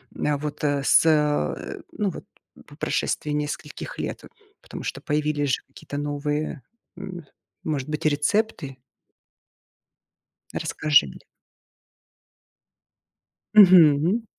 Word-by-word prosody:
М, 150 Hz, -1 st, 0 dB
вот, 150 Hz, 0 st, -6 dB
э, 145 Hz, -1 st, +1 dB
с 160 Hz, -, +5 dB
э, 150 Hz, -2 st, +1 dB
ну, 210 Hz, -2 st, -1 dB
вот 180 Hz, -, -8 dB, 0.4 s
по -, -, -15 dB
прошествии 150 Hz, -, -1 dB
нескольких 150 Hz, 0 st, -5 dB
лет. -, -, -4 dB, 0.4 s
Потому -, -, -9 dB
что -, -, -5 dB
появились 150 Hz, -1 st, -1 dB
же -, -, -13 dB
какие-то 145 Hz, -, -9 dB
новые, 145 Hz, +1 st, -3 dB, 0.4 s
м, 175 Hz, -4 st, -8 dB, 0.4 s
может 145 Hz, -3 st, -3 dB
быть, 150 Hz, 0 st, -4 dB
рецепты. 150 Hz, -1 st, 0 dB, 1.8 s
Расскажи 150 Hz, -, +2 dB
мне. 65 Hz, -, -11 dB, 2.3 s
Мгм. 180 Hz, 0 st, +6 dB
150 Hz, 100 wpm, -24 LUFS, 145-160 Hz, 2.3 s, Мгм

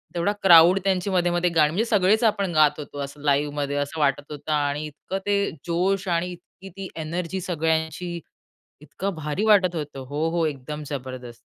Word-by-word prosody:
तेवढा 175 Hz, +4 st, +1 dB
क्राउड 175 Hz, +1 st, +8 dB
त्यांची 190 Hz, 0 st, 0 dB
मधे-मधे 175 Hz, -1 st, +1 dB
गाणी 155 Hz, -2 st, +5 dB
म्हणजे 210 Hz, +7 st, 0 dB
सगळेच 210 Hz, 0 st, +3 dB
आपण 200 Hz, -5 st, +1 dB
गात 150 Hz, -1 st, +4 dB
होतो, 145 Hz, -1 st, -8 dB
असं 140 Hz, +1 st, -9 dB
लाईव्हमध्ये 145 Hz, 0 st, 0 dB
असं 145 Hz, +2 st, -3 dB
वाटत 145 Hz, +1 st, 0 dB
होतं. 150 Hz, +1 st, -6 dB
आणि 145 Hz, 0 st, 0 dB
इतकं 155 Hz, +5 st, -6 dB
ते 200 Hz, 0 st, +1 dB, 0.2 s
जोश 185 Hz, +3 st, 0 dB
आणि 175 Hz, +1 st, 0 dB
इतकी 180 Hz, +2 st, -13 dB
ती 195 Hz, -1 st, -5 dB
एनर्जी 170 Hz, +4 st, -3 dB
सगळ्यांची, 160 Hz, 0 st, -2 dB, 0.6 s
इतकं 190 Hz, +7 st, -4 dB
भारी 155 Hz, +6 st, -2 dB
वाटत 190 Hz, -5 st, +4 dB
होतं. 145 Hz, -3 st, -5 dB
हो, 150 Hz, +4 st, -1 dB
हो. 170 Hz, 0 st, 0 dB
एकदम 150 Hz, +1 st, -5 dB
जबरदस्त. 130 Hz, -4 st, -6 dB
165 Hz, 165 wpm, -24 LUFS, 145-185 Hz, 0.6 s, क्राउड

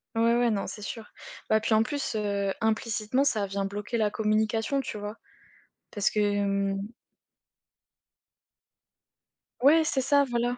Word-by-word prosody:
Ouais, 230 Hz, +1 st, +3 dB
ouais, 240 Hz, -1 st, +3 dB
non, 200 Hz, -2 st, -1 dB
c'est 210 Hz, -, -8 dB
sûr. 220 Hz, +2 st, -7 dB, 0.4 s
Bah 220 Hz, 0 st, +4 dB
puis 220 Hz, -, 0 dB
en 220 Hz, +1 st, +5 dB
plus, 285 Hz, -3 st, -3 dB
heu, 200 Hz, -2 st, -1 dB
implicitement 220 Hz, +3 st, 0 dB
ça 210 Hz, -7 st, +1 dB
vient 195 Hz, 0 st, -2 dB
bloquer 205 Hz, +4 st, -3 dB
la 215 Hz, -2 st, +2 dB
communication, 220 Hz, +5 st, 0 dB
tu 240 Hz, -, -4 dB
vois? 210 Hz, +2 st, -6 dB, 0.8 s
Parce 205 Hz, 0 st, +1 dB
que, 205 Hz, -1 st, +1 dB, 0.3 s
mmh 195 Hz, +2 st, -5 dB, 2.7 s
Ouais, 315 Hz, +4 st, +6 dB
c'est 275 Hz, -3 st, 0 dB
ça, 285 Hz, +2 st, +4 dB
voilà. 245 Hz, +1 st, 0 dB
220 Hz, 140 wpm, -27 LUFS, 205-240 Hz, 2.7 s, Ouais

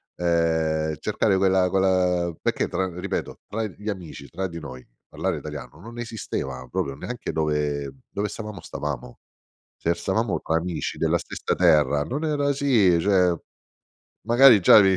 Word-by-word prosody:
ehm, 80 Hz, -2 st, +1 dB
cercare -, -, +1 dB
quella 95 Hz, -1 st, +3 dB
quella, 90 Hz, -2 st, +2 dB
perché, -, -, 0 dB
tra 95 Hz, +1 st, -1 dB
ripeto, 100 Hz, +1 st, -4 dB
tra 110 Hz, +2 st, -2 dB
gli 105 Hz, +1 st, -6 dB
amici, 85 Hz, -8 st, -7 dB
tra 95 Hz, +7 st, -3 dB
di 85 Hz, -2 st, -7 dB
noi, 65 Hz, -4 st, -9 dB, 0.2 s
parlare -, -, -2 dB
italiano 75 Hz, -, -8 dB
non 115 Hz, +4 st, -9 dB
esisteva 65 Hz, -, -4 dB
proprio 70 Hz, -, -2 dB
neanche 120 Hz, -, -5 dB
dove 75 Hz, -2 st, -1 dB, 0.2 s
dove 105 Hz, +1 st, -2 dB
stavamo, 105 Hz, -3 st, -7 dB
stavamo. 70 Hz, -6 st, -5 dB, 0.6 s
Se 85 Hz, -, 0 dB
stavamo 95 Hz, +4 st, -1 dB
tra 80 Hz, -, 0 dB
amici 85 Hz, 0 st, -3 dB
della -, -, +2 dB
stessa -, -, -3 dB
terra, 75 Hz, -5 st, +4 dB
non 140 Hz, -, -3 dB
era 145 Hz, -2 st, +1 dB
sì 115 Hz, -11 st, +3 dB
cioè, 90 Hz, -1 st, +3 dB, 0.9 s
magari, 120 Hz, -2 st, +7 dB
già 90 Hz, -, +8 dB
vi 95 Hz, -1 st, +4 dB
90 Hz, 150 wpm, -24 LUFS, 80-105 Hz, 0.9 s, già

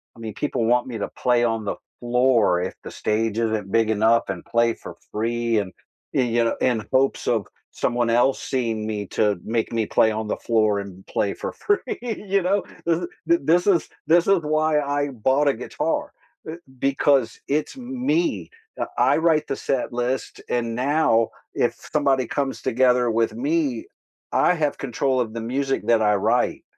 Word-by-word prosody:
I -, -, -16 dB
mean, 110 Hz, -2 st, -6 dB
people 120 Hz, -1 st, -1 dB
want 120 Hz, +2 st, +2 dB
me 120 Hz, -3 st, -5 dB
to 105 Hz, -, -3 dB
play 120 Hz, -1 st, +1 dB
on 115 Hz, -2 st, 0 dB
the 100 Hz, -, -2 dB, 0.2 s
floor 120 Hz, -6 st, +3 dB
if 90 Hz, +1 st, -3 dB
the -, -, -7 dB
stage 110 Hz, 0 st, -1 dB
isn't 110 Hz, -4 st, -1 dB
big 115 Hz, -1 st, +3 dB
enough 110 Hz, +2 st, +3 dB
and -, -, -4 dB
play 115 Hz, 0 st, +2 dB
for -, -, -10 dB, 0.2 s
free 115 Hz, +1 st, 0 dB
and, 100 Hz, -2 st, -4 dB, 0.4 s
y 130 Hz, -, +3 dB
you 120 Hz, -1 st, +1 dB
know, 115 Hz, -, 0 dB
in 115 Hz, -5 st, 0 dB
hopes 135 Hz, +1 st, +1 dB
of 110 Hz, -5 st, +1 dB, 0.2 s
someone 120 Hz, -1 st, -1 dB
else 120 Hz, +3 st, +3 dB
seeing 115 Hz, -4 st, -2 dB
me 105 Hz, -2 st, -3 dB
to 105 Hz, -3 st, 0 dB
make 115 Hz, 0 st, -1 dB
me 115 Hz, -2 st, 0 dB
play 110 Hz, -, +3 dB
on 110 Hz, 0 st, -3 dB
the -, -, -2 dB
floor 110 Hz, -3 st, +1 dB
and 95 Hz, -1 st, -9 dB
play 100 Hz, -, -1 dB
for -, -, -5 dB
free, 410 Hz, -10 st, -1 dB
you 205 Hz, -5 st, -1 dB
know? 195 Hz, +2 st, +1 dB, 0.2 s
This 165 Hz, -1 st, +2 dB
is 175 Hz, 0 st, -4 dB, 0.2 s
th 170 Hz, 0 st, +5 dB
this 170 Hz, +6 st, +3 dB
is 175 Hz, -6 st, +3 dB, 0.2 s
this 170 Hz, +2 st, +5 dB
is 195 Hz, -1 st, +5 dB
why 155 Hz, 0 st, +2 dB
I 145 Hz, 0 st, -1 dB
bought 130 Hz, +4 st, +1 dB
a 140 Hz, -, +4 dB
guitar, 160 Hz, -, -2 dB, 0.4 s
e -, -, -4 dB, 0.3 s
because 135 Hz, -2 st, +3 dB, 0.3 s
it's 155 Hz, -, -5 dB
me. 265 Hz, +6 st, -1 dB, 0.3 s
I -, -, 0 dB, 0.3 s
I -, -, +1 dB
write 160 Hz, -2 st, +2 dB
the -, -, -2 dB
set 135 Hz, -3 st, -2 dB
list, 130 Hz, +2 st, -3 dB
and 115 Hz, -1 st, -1 dB
now 125 Hz, -3 st, +2 dB, 0.4 s
if -, -, +1 dB, 0.2 s
somebody 135 Hz, -3 st, +2 dB
comes 140 Hz, -2 st, 0 dB
together 125 Hz, -1 st, +3 dB
with 115 Hz, -, +2 dB, 0.2 s
me, 310 Hz, -4 st, 0 dB, 0.5 s
I -, -, +3 dB
have 145 Hz, -, 0 dB
control 130 Hz, +1 st, 0 dB
of 110 Hz, -3 st, -4 dB
the 115 Hz, -, -4 dB
music 135 Hz, 0 st, 0 dB
that 115 Hz, -1 st, +4 dB
I 105 Hz, -1 st, +3 dB, 0.2 s
write, -, -, +1 dB
125 Hz, 185 wpm, -23 LUFS, 115-150 Hz, 0.5 s, th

